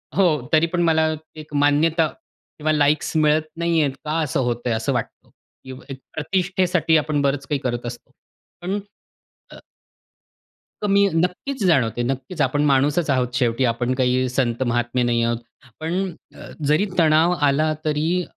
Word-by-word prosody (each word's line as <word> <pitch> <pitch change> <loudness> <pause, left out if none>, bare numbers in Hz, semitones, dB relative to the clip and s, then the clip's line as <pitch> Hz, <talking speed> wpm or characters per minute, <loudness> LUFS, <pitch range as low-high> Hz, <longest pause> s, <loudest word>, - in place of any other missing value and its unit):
हो, 195 - +4 0.3
तरी 160 +1 +5
पण 175 +1 -1
मला 160 -1 +2 0.3
एक 150 -1 -12
मान्यता 155 +3 +3
किंवा 155 - -7
लाइक्स 150 +1 +1
मिळत 155 0 +3
नाही 170 -1 +1
आहेत. 140 - +1
का 155 +2 -1
असं 150 0 -1
होतंय? 120 0 -1
असं 115 +5 -1
वाटतं. 120 - -5 0.6
एक 135 - -4 0.2
प्रतिष्ठेसाठी 180 0 +1
आपण 150 -1 0
बरंच 140 0 0
काही 145 -2 -1
करत 120 -1 -3
असतो. 120 0 -8 0.5
पण 195 +4 -2 0.7
अ - - -11 1.2
कमी 200 -1 +3
नक्कीच 180 +10 -1
जाणवते. 120 -8 +2
नक्कीच 135 +6 -3
आपण 145 +2 +1
माणूसच 145 +3 +2
आहोत 125 -2 0
शेवटी 120 +1 +1
आपण 120 +2 -1
काही 130 0 +1
संत 125 -1 0
महात्मे 120 +1 0
नाही 120 -1 +1
आहोत. 115 0 0 0.4
पण 180 +3 -2 0.5
जरी 155 +8 +3
तणाव 160 +2 +4
आला 155 +3 +2
तरी, 160 +4 0
150 Hz, 145 wpm, -22 LUFS, 130-165 Hz, 1.2 s, तरी